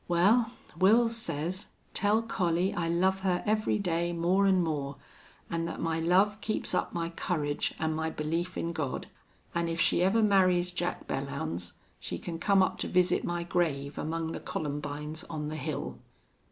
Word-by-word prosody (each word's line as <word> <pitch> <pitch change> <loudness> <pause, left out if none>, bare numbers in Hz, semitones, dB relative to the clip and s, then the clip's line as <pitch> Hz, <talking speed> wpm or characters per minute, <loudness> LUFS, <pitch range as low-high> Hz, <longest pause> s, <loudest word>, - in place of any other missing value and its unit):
"Well, 205 +7 +4 0.3
Wils 225 +5 +5
says, 185 -4 -1 0.3
tell 210 +2 +2
Collie 180 -4 +1
I 165 -1 -1
love 190 +3 +2
her 185 -2 0
every 215 0 +2
day 170 -3 0
more 180 +4 +3
an' 190 -2 +4
more, 145 -4 -2 0.5
an' 165 0 -2
that 165 - -5
my 165 -1 0
love 195 +6 +3
keeps 215 - -2
up - - 0
my 170 -1 -2
courage 150 -4 -1
an' 160 0 0
my 160 +1 -1
belief 165 +4 -2
in 170 0 -2
God, 145 -5 -3 0.5
an' 170 0 0
if 165 0 -2
she 170 - +3
ever 205 +5 +4
marries 185 -3 +4
Jack 175 0 -3
Belllounds 90 - -3 0.3
she 85 - -4
can 165 - -6
come 195 +1 +4
up - - -1
to - - -1
visit 180 0 +2
my 175 0 -2
grave 155 -6 -1
among 165 +1 -2
the - - -4
columbines 150 +2 -4
on 150 -2 -4
the 155 - -4
hill." 155 0 -4
170 Hz, 170 wpm, -30 LUFS, 155-190 Hz, 0.5 s, Wils